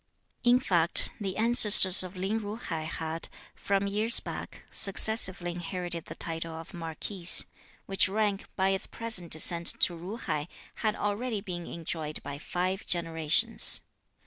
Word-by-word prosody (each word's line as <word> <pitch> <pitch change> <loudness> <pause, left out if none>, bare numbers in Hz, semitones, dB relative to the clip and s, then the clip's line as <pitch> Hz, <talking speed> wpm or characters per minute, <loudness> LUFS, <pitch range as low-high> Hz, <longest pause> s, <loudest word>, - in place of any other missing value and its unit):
In 245 0 +3
fact, 175 -8 +1
the 195 -3 -6
ancestors 215 -4 +6
of 185 0 -8
Lin 195 +4 -4
Ju 210 0 -8
hai 165 -9 -7
had, 160 0 -6 0.2
from 195 0 -3
years 215 +4 +2
back, - - -10
successively 195 -3 +2
inherited 175 -1 -7
the - - -11
title 165 0 -4
of 165 +4 -11
Marquis, 170 +2 -8 0.6
which 195 -1 +1
rank, 205 -1 -3
by 190 0 -1
its 195 -1 -3
present 220 -7 -3
descent 170 +2 +2
to 175 - +3
Ju 190 +7 -9
hai, 150 -9 -5 0.3
had 215 -2 -3
already 210 +2 -4
been 180 -4 -8
enjoyed 160 -2 -6
by 145 0 -9
five 185 +4 -5
generations. 165 +5 +5
185 Hz, 145 wpm, -26 LUFS, 165-205 Hz, 0.6 s, ancestors